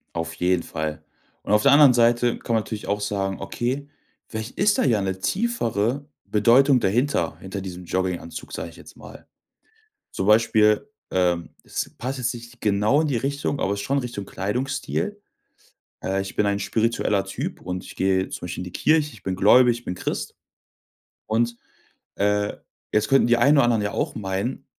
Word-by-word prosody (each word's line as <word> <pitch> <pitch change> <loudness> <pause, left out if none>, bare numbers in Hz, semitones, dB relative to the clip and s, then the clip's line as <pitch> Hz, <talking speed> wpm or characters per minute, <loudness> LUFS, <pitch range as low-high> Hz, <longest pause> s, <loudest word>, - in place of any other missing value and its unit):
Auf 85 -1 -3
jeden 90 -1 +1
Fall. 80 -1 -4 0.4
Und - - -3
auf 105 0 +5
der 140 - +5
anderen 140 -3 +7
Seite 120 0 +3
kann 115 - -2
man 110 - +2
natürlich 105 0 -6
auch 105 +1 0
sagen: 100 -1 -2
„Okay, 130 +8 -3 0.4
vielleicht 110 +2 -6
ist 205 +1 +3
da - - +3
ja 115 -6 +3
'ne 95 -1 -3
tiefere 140 - 0 0.2
Bedeutung 125 +5 +4
dahinter, 120 +8 0
hinter 95 +1 -6
diesem 90 -1 -7
Jogginganzug." 90 -2 -3
sag 85 - -5
ich 85 - -14
jetzt - - -14
mal. - - -13 0.9
Zum 95 - -3
Beispiel, 105 - +4 0.2
ähm, 90 -2 +1
es - - -4
passt 130 +3 -4
jetzt 125 0 0
nicht 120 0 -11
genau 105 +7 +3
in 160 - 0
die 135 -5 0
Richtung, 140 +3 -2
aber 100 - 0
ist 100 - -3
schon 140 +7 0
Richtung 120 -6 -5
Kleidungsstil. 135 - -3 0.8
Äh, 95 +1 0
ich 95 - -7
bin 105 - +2
ein 100 0 0
spiritueller 105 -1 0
Typ - - -5
und 90 0 -5
ich - - -11
gehe 95 0 +1
zum - - -6
Beispiel 90 - -5
in - - -4
die 90 - -8
Kirche, 155 -1 +3
ich 110 - -16
bin 95 -1 -2
gläubig, 120 +5 +5
ich 120 - -24
bin 90 - -3
Christ. - - -4 0.9
Und, 115 +2 0 0.6
äh, 105 0 +1 0.4
jetzt 110 0 +1
könnten 135 -3 +4
die 120 0 +4
einen 140 +5 +5
oder 140 - +5
anderen 115 -3 +2
ja 100 - -1
auch 145 +4 -2
meinen 105 +6 -3
110 Hz, 185 wpm, -24 LUFS, 95-125 Hz, 0.9 s, anderen